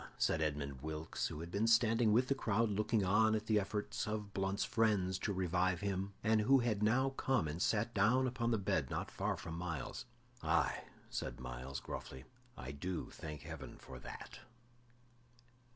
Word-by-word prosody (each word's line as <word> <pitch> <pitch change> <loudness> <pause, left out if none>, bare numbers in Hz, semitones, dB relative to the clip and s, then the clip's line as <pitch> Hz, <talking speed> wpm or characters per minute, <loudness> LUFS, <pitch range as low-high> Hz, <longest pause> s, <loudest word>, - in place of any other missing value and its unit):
said 80 - +2
Edmund 70 -3 -2
Wilkes, 80 +1 -3
who 75 - -6
had 85 +1 -7
been 105 +4 +1
standing 115 -1 +4
with 125 +4 +4
the 135 - +3
crowd 115 -4 +1
looking 105 0 +1
on 110 +3 +4
at 110 0 -2
the 110 -1 +3
efforts 105 +2 -2
of 105 -1 -3
Blunt's 95 +1 0
friends 100 -5 +2
to 105 - -1
revive 90 -1 +1
him, 100 0 -2
and 110 0 +4
who 135 +6 +6
had 115 -5 +1
now 125 +5 +3
come 130 -8 +1
and 75 +4 -4
sat 115 +2 +1
down 115 +6 +4
upon 120 -2 0
the 115 - +3
bed 100 - 0
not - - -3
far - - -1
from 80 - -6
Myles. 85 -3 -4 0.4
"Aye," - - +1 0.3
said - - -3
Myles, 65 +2 -5
gruffly, 65 -1 -7 0.3
"I 65 +2 -6
do 85 +5 -4
thank 75 -2 -7
Heaven 80 -4 -8
for - - -10
that." - - -9
100 Hz, 175 wpm, -36 LUFS, 80-110 Hz, 0.4 s, who